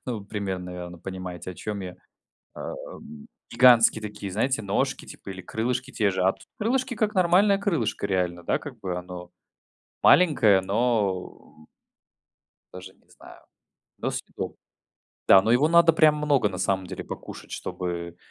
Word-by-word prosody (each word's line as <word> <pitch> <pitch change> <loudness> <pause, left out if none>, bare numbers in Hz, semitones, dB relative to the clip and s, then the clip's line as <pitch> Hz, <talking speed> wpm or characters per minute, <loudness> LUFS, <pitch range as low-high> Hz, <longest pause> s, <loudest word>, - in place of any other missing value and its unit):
ну, 115 -5 -3
примерно, 95 -3 -4
наверное, 90 -1 -8
понимаете 90 -1 -7
о - - -15
чем 105 +2 -5
я, 90 -1 -7 0.6
э, - - -5 0.8
гигантские 120 -3 +6
такие 105 -2 -6
знаете 115 +4 0
ножки, 100 0 -1
типа - - -10
или 95 0 -8
крылышки 125 +7 -3
те 105 -6 +1
же. 95 -1 -1
А 95 +1 +4
тут - - -19
крылышки- 255 +3 0
как 215 -1 -1
нормальное 190 +2 +4
крылышко 155 - -1
реально, 90 -3 -1
да - - +1
как 130 -5 -9
бы 95 -4 -4
оно 90 0 -8 0.7
маленькое, 120 - +5
но 100 -7 -2 1.1
даже 95 +1 -10
не - - -33
знаю, - - -15 0.6
но - - -2
съедобное. - - -6 0.7
Да, 95 - +8
но 110 - 0
его 140 +6 +4
надо 170 0 +6
прям 155 -1 +4
много, 145 -7 +2
на 95 -2 -7
самом 95 0 0
деле, - - -7
покушать, - - -9
чтобы 85 -1 -5
100 Hz, 150 wpm, -25 LUFS, 90-135 Hz, 1.1 s, Да